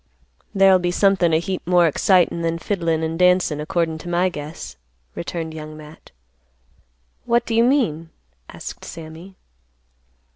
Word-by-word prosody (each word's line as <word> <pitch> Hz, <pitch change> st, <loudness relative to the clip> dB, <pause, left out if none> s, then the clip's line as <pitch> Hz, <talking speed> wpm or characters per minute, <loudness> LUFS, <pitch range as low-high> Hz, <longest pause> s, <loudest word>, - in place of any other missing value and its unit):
"There'll 195 Hz, -1 st, +6 dB
be 175 Hz, 0 st, -1 dB
somethin' 185 Hz, -2 st, +2 dB
a 160 Hz, -, +4 dB
heap 185 Hz, +3 st, -3 dB
more 175 Hz, -1 st, +4 dB
excitin' 175 Hz, +2 st, +2 dB
than 165 Hz, 0 st, -1 dB
fiddlin' 165 Hz, -2 st, -1 dB
and 160 Hz, +1 st, -3 dB
dancin', 180 Hz, -4 st, +3 dB
accordin' 160 Hz, 0 st, -1 dB
to 175 Hz, -, -8 dB
my 175 Hz, +2 st, +2 dB
guess," 150 Hz, -1 st, -8 dB, 0.4 s
returned 165 Hz, -2 st, -5 dB
Young 155 Hz, -1 st, -8 dB
Matt. 155 Hz, +1 st, -14 dB, 1.2 s
"What 235 Hz, 0 st, +2 dB
do 230 Hz, -, -3 dB
you 230 Hz, +1 st, +4 dB
mean?" 200 Hz, -, +1 dB, 0.4 s
asked -, -, -9 dB
Sammy. 165 Hz, +4 st, -10 dB
170 Hz, 140 wpm, -21 LUFS, 160-185 Hz, 1.2 s, There'll